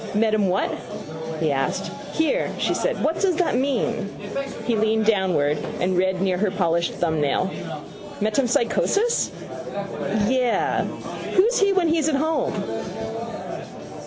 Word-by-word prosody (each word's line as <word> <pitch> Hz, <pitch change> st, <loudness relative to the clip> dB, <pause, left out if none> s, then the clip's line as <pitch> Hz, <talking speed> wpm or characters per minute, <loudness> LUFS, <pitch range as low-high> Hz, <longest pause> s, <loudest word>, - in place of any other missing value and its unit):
—Met 215 Hz, 0 st, +3 dB
him 205 Hz, -3 st, +3 dB
what? 190 Hz, +3 st, +1 dB, 0.7 s
he 155 Hz, -2 st, +2 dB
asked. 135 Hz, -1 st, -1 dB, 0.2 s
—Here, 320 Hz, +11 st, +1 dB
she -, -, +1 dB
said. -, -, -1 dB
What 320 Hz, +2 st, +1 dB
does 380 Hz, -3 st, +3 dB
that 350 Hz, 0 st, +1 dB
mean? 235 Hz, -5 st, 0 dB, 0.6 s
He 235 Hz, -, +2 dB
leaned 220 Hz, 0 st, +2 dB
downward 180 Hz, -9 st, +2 dB, 0.2 s
and 185 Hz, +1 st, +1 dB
read 190 Hz, +1 st, +2 dB
near 185 Hz, -2 st, +1 dB
her 210 Hz, 0 st, +2 dB
polished 170 Hz, -3 st, +1 dB
thumbnail. 160 Hz, +2 st, +1 dB, 0.7 s
—Metempsychosis? 245 Hz, -, +2 dB, 1.0 s
—Yes. 250 Hz, -2 st, +2 dB, 0.5 s
Who's 460 Hz, +7 st, +5 dB
he 400 Hz, -1 st, +4 dB
when 375 Hz, -3 st, +3 dB
he's 315 Hz, -1 st, +2 dB
at 300 Hz, -, +2 dB
home? 315 Hz, +3 st, +1 dB
220 Hz, 125 wpm, -23 LUFS, -, 1.0 s, Who's